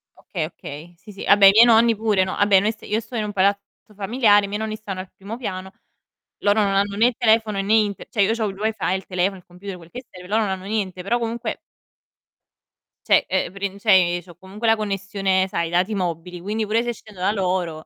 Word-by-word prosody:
Okay, 165 Hz, -5 st, -5 dB
okay. 160 Hz, +1 st, -10 dB
Sì, 210 Hz, -, -14 dB
sì, 195 Hz, -, -9 dB
vabbè 200 Hz, -1 st, +6 dB
i -, -, +9 dB
miei 225 Hz, +4 st, +7 dB
nonni 230 Hz, -1 st, +5 dB
pure, 210 Hz, -3 st, +1 dB
no, 185 Hz, -, -3 dB
Vabbè 205 Hz, -2 st, +4 dB
noi 210 Hz, +3 st, +1 dB
st 215 Hz, -, -18 dB
io 215 Hz, +2 st, -1 dB
sto 230 Hz, +2 st, -10 dB
in 220 Hz, -, -1 dB
un 210 Hz, -, -4 dB
palazzo 200 Hz, +1 st, +2 dB, 0.4 s
familiare, 205 Hz, 0 st, +3 dB
i -, -, -6 dB
miei 205 Hz, +2 st, -4 dB
nonni 220 Hz, 0 st, -3 dB
stanno 200 Hz, -3 st, -7 dB
al 185 Hz, -, -7 dB
primo 205 Hz, +4 st, -8 dB
piano, 190 Hz, -5 st, -6 dB, 0.7 s
loro 205 Hz, +1 st, +3 dB
non 200 Hz, -1 st, +1 dB
hanno 200 Hz, +1 st, +1 dB
né 225 Hz, +3 st, +4 dB
il 245 Hz, -, -1 dB
telefono 220 Hz, -3 st, +2 dB
né 200 Hz, +3 st, 0 dB
Inter 210 Hz, -3 st, +1 dB
cioè 210 Hz, -, 0 dB
io 200 Hz, +3 st, +3 dB
c'ho 225 Hz, -1 st, -1 dB
il 195 Hz, -, -6 dB
Wi-Fi, 215 Hz, -2 st, -1 dB
il 190 Hz, -, -5 dB
telefono, 185 Hz, +1 st, -1 dB
il 180 Hz, -, -18 dB
computer, 180 Hz, +1 st, -9 dB
quel 165 Hz, -1 st, -15 dB
che 250 Hz, 0 st, -9 dB
serve, 180 Hz, 0 st, -12 dB
loro 220 Hz, +3 st, +1 dB
non 205 Hz, -, -1 dB
hanno 190 Hz, 0 st, -5 dB
niente, 195 Hz, -3 st, -3 dB
però 235 Hz, +5 st, 0 dB
comunque 235 Hz, +1 st, -4 dB, 1.5 s
cioè, -, -, +5 dB
ehm, 185 Hz, -1 st, 0 dB
prin 200 Hz, 0 st, -4 dB
cioè, 185 Hz, -5 st, +4 dB
ehm, -, -, -7 dB
c'ho 175 Hz, -2 st, -15 dB
comunque 195 Hz, +5 st, -6 dB
la 225 Hz, -, +5 dB
connessione, 195 Hz, -2 st, -1 dB
sai, 170 Hz, -3 st, -2 dB
i -, -, -7 dB
dati 185 Hz, +5 st, +1 dB
mobili, 175 Hz, -1 st, -4 dB
quindi 215 Hz, +3 st, -2 dB
pure 220 Hz, +3 st, +1 dB
se 240 Hz, -, -2 dB
scendo 210 Hz, -4 st, -14 dB
da 190 Hz, -, +2 dB
loro, 180 Hz, -5 st, -2 dB
200 Hz, 240 wpm, -22 LUFS, 185-220 Hz, 1.5 s, i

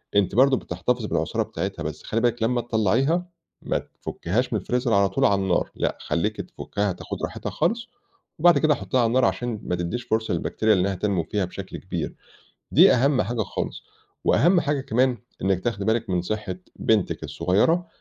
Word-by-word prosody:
أنتِ 100 Hz, 0 st, +2 dB
برضو 135 Hz, +1 st, +5 dB
بتحتفظي 125 Hz, -2 st, -2 dB
بالعصارة -, -, 0 dB
بتاعتها، -, -, -4 dB
بس -, -, -5 dB
خلّي 115 Hz, -, -1 dB
بالِك 120 Hz, -1 st, +1 dB
لما 120 Hz, +1 st, +1 dB
تطلّعيها، 120 Hz, -, +1 dB, 0.3 s
ما -, -, -1 dB
تفكّيهاش 110 Hz, +10 st, -3 dB
من -, -, +1 dB
الفريزر 125 Hz, -1 st, 0 dB
على 100 Hz, -1 st, +4 dB
طول 135 Hz, -, +1 dB
على 100 Hz, -5 st, +3 dB
النار، 95 Hz, -2 st, 0 dB
لأ، -, -, -1 dB
خلّيكي 105 Hz, +6 st, -1 dB
تفكّها 105 Hz, -1 st, -3 dB
تاخد 90 Hz, -, -7 dB
راحتها -, -, -4 dB
خالص، 230 Hz, +9 st, -1 dB, 0.5 s
وبعد 170 Hz, -2 st, +6 dB
كده 150 Hz, 0 st, +3 dB
حطّيها 130 Hz, -1 st, -1 dB
على 115 Hz, -, +3 dB
النار 125 Hz, +3 st, +3 dB
علشان 120 Hz, -4 st, -1 dB
ما 90 Hz, -, -1 dB
تديش 90 Hz, +8 st, -3 dB
فرصة 110 Hz, -1 st, -1 dB
للبكتيريا 110 Hz, -1 st, +1 dB
إنها 95 Hz, +1 st, +1 dB
تنمو 95 Hz, -2 st, 0 dB
فيها 100 Hz, +3 st, -1 dB
بشكل 95 Hz, +1 st, -7 dB
كبير، 85 Hz, -4 st, -4 dB, 0.6 s
دي -, -, +7 dB
أهم 130 Hz, +1 st, +3 dB
حاجة 120 Hz, -2 st, -2 dB
خالص. -, -, -4 dB, 0.4 s
وأهم 175 Hz, +2 st, +4 dB
حاجة 145 Hz, -1 st, 0 dB
كمان 125 Hz, 0 st, +1 dB, 0.2 s
إنِّك 95 Hz, -1 st, +1 dB
تاخدي 105 Hz, -4 st, -1 dB
بالِك 110 Hz, -2 st, 0 dB
من 90 Hz, -1 st, +1 dB
صحة 105 Hz, -1 st, -3 dB, 0.2 s
بنتِك 110 Hz, -4 st, +1 dB
الصغيّرة، 105 Hz, -, +1 dB
110 Hz, 175 wpm, -24 LUFS, 100-130 Hz, 0.6 s, دي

